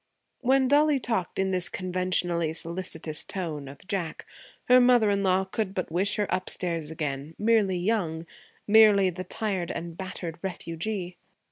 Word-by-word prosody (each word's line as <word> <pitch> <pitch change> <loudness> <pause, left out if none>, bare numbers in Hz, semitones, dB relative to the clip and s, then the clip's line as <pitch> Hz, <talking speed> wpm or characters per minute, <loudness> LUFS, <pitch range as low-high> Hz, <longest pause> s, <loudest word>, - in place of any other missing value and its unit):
When 265 +1 +3
Dollie 290 +1 +4
talked 225 -8 -2
in 190 0 +1
this 180 -2 -1
conventionally 180 -3 0
solicitous 165 -2 -5
tone 155 -7 -5
of 140 +6 -12
Jack, 180 -6 -3 0.4
her 250 0 +7
mother 245 -4 +5
in 200 0 +1
law 190 0 +2
could 190 0 -3
but 185 -3 -3
wish 195 +5 +1
her 210 - 0
upstairs 170 -4 0
again, 150 -1 -4
merely 210 -4 +2
young, 175 -4 -1 0.4
merely 205 -3 +6
the 180 +2 -6
tired 190 -2 -3
and 170 0 -5
battered 175 -3 -6
refugee. 180 +1 -4
185 Hz, 145 wpm, -27 LUFS, 170-210 Hz, 0.4 s, her